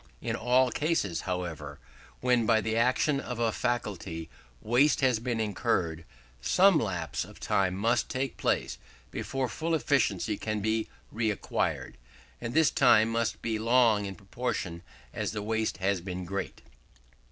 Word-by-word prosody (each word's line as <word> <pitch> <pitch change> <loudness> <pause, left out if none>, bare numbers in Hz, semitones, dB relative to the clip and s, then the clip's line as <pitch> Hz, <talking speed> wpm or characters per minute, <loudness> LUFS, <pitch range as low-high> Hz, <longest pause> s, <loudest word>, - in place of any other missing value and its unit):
In - - -2
all 125 +2 +3
cases, 145 - 0
however, 80 -6 -4 0.4
when, 125 -3 +2
by 115 -2 +5
the 110 0 -1
action 130 +5 +2
of 125 -3 -5
a 115 -1 +1
faculty, 100 -10 -3 0.3
waste 125 - +3
has 130 -4 +3
been 120 -1 -2
incurred, 85 -6 -1 0.4
some 185 - +5
lapse 90 - -2
of - - -13
time 95 -2 +1
must 115 +4 +1
take 130 0 -2
place - - -1 0.3
before 135 -1 -2
full 160 +8 -1
efficiency 110 - +1
can 110 -1 -2
be 110 +1 0 0.3
reacquired; 110 -3 -1 0.4
and 115 +3 -4
this 160 -1 +5
time 110 +1 +5
must 115 0 -1
be 110 -2 -1
long 115 -2 +4
in 95 - -6
proportion 100 -5 -4 0.3
as - - -2
the 105 -2 -3
waste 110 +1 -1
has 95 -1 0
been 90 0 -5
great. 100 +2 -5
110 Hz, 145 wpm, -29 LUFS, 95-125 Hz, 0.4 s, by